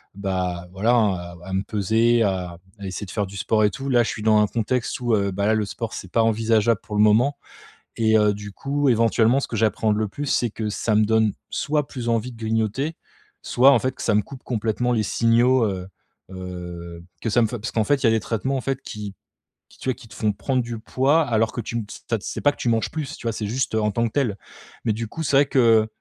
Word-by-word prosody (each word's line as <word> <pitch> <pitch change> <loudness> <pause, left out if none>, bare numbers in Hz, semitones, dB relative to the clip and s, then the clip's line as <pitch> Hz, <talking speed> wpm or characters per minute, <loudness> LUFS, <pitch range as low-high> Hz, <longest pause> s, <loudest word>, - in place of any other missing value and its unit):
bah, 90 -3 -3
voilà, 105 +6 +1
hein, 110 -4 +3
à 85 0 -8
à - - -5
me 95 - +1
peser, 110 +3 +2
à 90 -4 -2 0.2
à 100 - -7
essayer 95 +2 -5
de 95 - -10
faire 105 -3 -1
du 100 +1 -9
sport 110 +2 +1
et 105 - +5
tout. 135 +7 -7
Là, 125 -3 +4
je - - -2
suis 105 - -5
dans 110 -1 +5
un 105 - +3
contexte 120 +2 -1
où, 120 -2 0 0.2
bah, 100 +2 -1
là, 110 - +3
le 110 -1 +1
sport 115 +3 -5
c'est 95 - -7
pas 115 - +3
envisageable 110 -1 +2
pour 105 - -7
le 105 - +3
moment 120 +7 +4 0.6
et 110 -1 +3
heu, 105 -1 +4
du 105 0 -8
coup, 140 +5 -1
éventuellement 115 +1 +3
ce - - -4
que 115 - -4
j'appréhende 110 0 +1
le 110 0 0
plus 145 +8 -5
c'est 120 -3 +1
que 110 0 -4
ça 105 +1 -1
me 105 +1 +4
donne 110 -1 +2 0.2
soit 150 -1 -1
plus 120 -3 -5
envie 115 +1 0
de 115 - -14
grignoter 115 +7 -1 0.5
soit, 130 +3 +5
en 125 - +5
fait, 130 +2 -3
ça 110 - +1
me 105 - +3
coupe 130 +5 -11
complètement 115 +1 -1
les 115 -3 +2
signaux, 120 +3 +3
heu 95 -2 -4 0.4
heu, 90 -2 -8 0.2
que 115 - -2
ça 120 - +3
me 115 - +4
fait 120 - -4
parce 115 - -4
qu'en 110 - +1
fait, 140 +4 +1
il - - +3
y - - +6
a - - +5
des 110 - +3
traitements, 120 +5 -2
en - - -1
fait, 135 0 -2
qui 105 -2 -7 0.5
qui, - - -21
tu - - -3
vois, - - +2
qui 115 - -15
te 105 - -15
font 105 0 +1
prendre 130 +5 -1
du 120 -1 -6
poids 135 +7 +2
alors 115 -4 +1
que - - -6
tu 115 - -6
m 115 - -3
s - - -11
tu 115 - +1
as - - -3
C'est - - -5
pas 145 - +4
que - - -21
tu 120 - -1
manges 115 -1 +1
plus, 155 -4 -5
tu - - -6
vois? 115 - 0
C'est 110 - -4
juste, 120 +1 -1
heu, 110 - +2
en 105 0 +1
tant 115 +3 0
que 110 - -10
tel, 120 -8 0 0.5
mais 110 - +2
du 115 +2 -4
coup 165 - -6
c'est 140 - +1
vrai 140 - +5
que, 135 - +1
heu, 115 -3 +5
110 Hz, 270 wpm, -23 LUFS, 105-120 Hz, 0.6 s, y